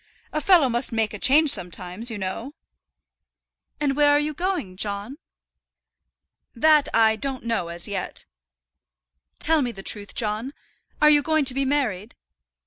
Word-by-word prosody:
A 305 - -1
fellow 345 -5 +5
must 240 +1 0
make 225 -2 -1
a 210 - -7
change 290 +5 +5
sometimes, 180 - -1
you 225 - -5
know." 205 +9 -5 1.2
"And 285 -2 0
where 290 0 +4
are 290 0 +4
you 300 +1 -2
going, 345 - -3
John?" 205 - -3 1.4
"That 300 +4 +4
I 220 -1 +3
don't 265 +3 -5
know 230 -7 -2
as 170 0 -6
yet." 200 -2 -5 1.1
"Tell 320 0 +2
me 245 -3 -2
the 195 -4 -11
truth, 205 0 -4
John; 225 +6 -3 0.5
are 300 - +8
you 295 -1 +5
going 315 0 +1
to 260 - +2
be 275 +1 -1
married? 245 -7 -2
250 Hz, 150 wpm, -23 LUFS, 210-290 Hz, 1.4 s, are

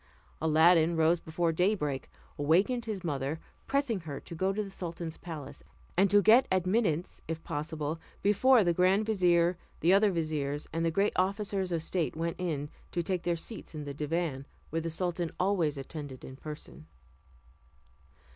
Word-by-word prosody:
Aladdin 160 +1 +5
rose 160 +2 +4
before 165 +1 -1
daybreak, 160 -6 0 0.3
awakened 190 - +2
his 210 -4 -4
mother, 145 -1 -2 0.3
pressing 275 -7 +1
her 150 -5 -6
to - - -10
go 185 +4 0
to 210 +2 -1
the 195 - -8
sultan's 170 -3 -5
palace, 155 -5 -8 0.3
and 195 +3 +4
to 205 +1 +5
get 230 +6 +6
admittance, 185 -2 +1
if 165 0 -4
possible, 155 +1 -3 0.2
before 220 +4 +5
the 175 -2 +2
grand 185 +4 +3
vizier, 175 -4 +3 0.2
the 175 +4 +4
other 205 +2 +5
viziers, 150 -4 -2
and 165 0 0
the 165 - +3
great 195 +5 +1
officers 195 0 0
of 165 -2 0
state 165 -2 -1
went 165 +1 -3
in 150 -5 -2 0.2
to 175 - -1
take 180 0 -1
their 175 -1 0
seats 185 0 -8
in 150 - -4
the 145 -1 -5
divan, 150 -2 -2 0.2
where 165 +1 0
the 165 - -3
sultan 175 0 -2
always 180 -6 +1
attended 135 -1 -7
in 130 - -9
person. 135 - -9
170 Hz, 165 wpm, -30 LUFS, 155-190 Hz, 0.3 s, get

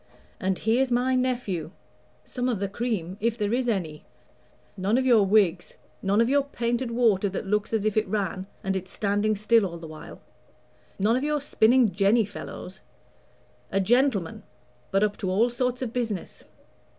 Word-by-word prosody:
And 190 0 0
here's 245 +4 +1
my 250 +2 +1
nephew 245 -11 -1 0.5
some 250 0 -3
of 230 -6 -1
the 200 - -1
cream, 195 -4 -3
if 230 +1 0
there 210 0 -1
is 245 0 0
any: 165 -8 -3 0.7
none 200 +4 +1
of 260 - +1
your 235 -5 +5
Whigs, 190 -4 +2 0.2
none 200 +2 +1
of 230 - +4
your 285 +2 +3
painted 240 -2 -2
water 225 -5 +2
that 195 - -5
looks 210 +1 -1
as 220 -2 0
if 215 - +1
it 215 -1 +1
ran, 190 -2 -2 0.2
and 195 0 -1
it's 190 0 -5
standing 205 +1 0
still 215 +2 +3
all 170 -3 -4
the 165 - -10
while; 155 -1 -10 0.8
none 210 +4 +2
of 260 - -1
your 300 0 0
spinning 245 -4 +3
jenny 200 +4 +3
fellows. 190 -1 -9 0.9
A 195 - +1
gentleman; 220 -3 +1 0.5
but 195 +1 +2
up 210 -1 0
to 190 - -3
all 220 +6 +2
sorts 250 +1 -1
of 235 -2 -5
business. 225 -7 -4
215 Hz, 175 wpm, -26 LUFS, 195-240 Hz, 0.9 s, your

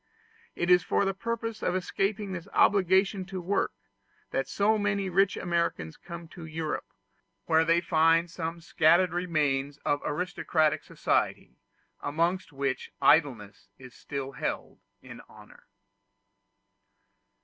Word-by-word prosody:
It 175 +1 0
is 180 0 +7
for 200 - +1
the 195 - 0
purpose 225 +2 -4
of 180 - 0
escaping 195 +2 -2
this 175 -2 -6
obligation 190 0 +3
to 190 0 -6
work, 185 +3 0 0.6
that 135 0 -1
so 215 +2 +2
many 200 -1 0
rich 195 +2 +2
Americans 170 - -1
come 170 -1 -9
to 170 - -11
Europe, 160 -1 -4 0.5
where 160 0 +4
they 165 +1 +3
find 165 0 +3
some 165 0 -5
scattered 170 +2 +3
remains 145 -5 0
of 145 0 +1
aristocratic 155 -1 0
society, - - -1 0.4
amongst 170 +5 -1
which 135 -2 -3
idleness 130 -10 +2
is 130 -2 -13
still 135 +1 -6
held - - -4 0.2
in - - -11
honor. - - -17
170 Hz, 125 wpm, -28 LUFS, 155-190 Hz, 0.6 s, is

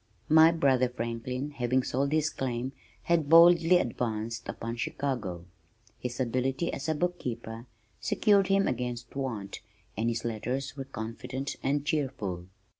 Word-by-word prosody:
My 160 +1 +8
brother 135 -6 +3
Franklin 125 +4 -4
having 130 -1 +1
sold 140 +3 0
his 155 0 +2
claim 125 0 -3 0.3
had 165 -4 +1
boldly 170 +1 +7
advanced 115 -4 -2
upon 115 +1 -4
Chicago. 115 -10 -3 0.5
His 125 0 -5
ability 130 +5 0
as 140 - -4
a 155 - +1
bookkeeper 120 -9 -3 0.3
secured 200 -2 +3
him 195 0 +3
against 120 -1 -3
want, 115 -8 -4 0.3
and 115 +3 0
his 115 - -3
letters 125 +5 -3
were 135 -2 -5
confident 130 +4 -5
and 140 +1 0
cheerful. 110 - -2
130 Hz, 130 wpm, -29 LUFS, 115-150 Hz, 0.5 s, My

